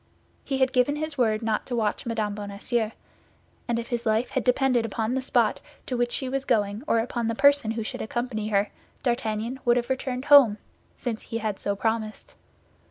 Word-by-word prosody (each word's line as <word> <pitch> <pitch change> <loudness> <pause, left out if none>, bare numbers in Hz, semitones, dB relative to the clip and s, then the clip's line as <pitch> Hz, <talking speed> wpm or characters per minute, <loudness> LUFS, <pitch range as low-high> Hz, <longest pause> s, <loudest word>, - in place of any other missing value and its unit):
He 270 - -2
had 260 0 +2
given 255 +3 +3
his 310 0 -4
word 225 -4 +1
not 220 -1 -1
to 245 - -2
watch 220 0 -1
Mme. 215 -3 -1
Bonacieux, 210 +3 -2 0.8
and 235 -1 0
if 235 +1 -4
his 240 -2 -2
life 220 +2 +1
had - - 0
depended 250 -1 +3
upon 225 +1 -2
the 265 - 0
spot 260 - +2 0.3
to 255 - -3
which 240 0 0
she 265 - -3
was 270 +1 -2
going 205 -3 0
or - - +3
upon 230 0 -1
the 230 - -1
person 285 -2 +4
who 225 0 -2
should - - -5
accompany 225 -1 -3
her, 205 -1 +1 0.3
D'Artagnan 235 0 -1
would 240 -1 +4
have 240 +1 -1
returned 260 0 -2
home, 270 -8 +7 0.4
since 235 -4 -3
he 230 - -5
had 215 -3 -3
so 200 - -1
promised. 220 0 -2
235 Hz, 195 wpm, -26 LUFS, 220-255 Hz, 0.8 s, home